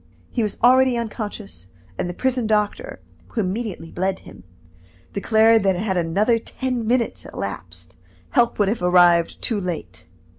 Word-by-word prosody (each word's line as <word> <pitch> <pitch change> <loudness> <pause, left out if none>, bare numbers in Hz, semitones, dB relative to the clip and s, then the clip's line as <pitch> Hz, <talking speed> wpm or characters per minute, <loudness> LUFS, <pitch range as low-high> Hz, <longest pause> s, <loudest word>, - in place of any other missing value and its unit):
He 240 - -1
was 210 -2 -2
already 255 0 +5
unconscious, 210 - -6 0.3
and 175 - -3
the 175 - -6
prison 255 -1 0
doctor, 215 - -1 0.3
who 230 - -2
immediately 195 -3 -4
bled 190 +1 -2
him, - - -14 0.7
declared 220 +2 +4
that 195 -1 +2
had 190 +1 -1
another 195 +7 +2
ten 250 -1 -3
minutes 240 0 0
elapsed, - - -7 0.3
help 240 -3 +2
would 205 - +2
have 215 +1 -1
arrived 175 -1 +4
too 225 -4 -1
late. 160 - -6
210 Hz, 145 wpm, -22 LUFS, 180-235 Hz, 0.7 s, already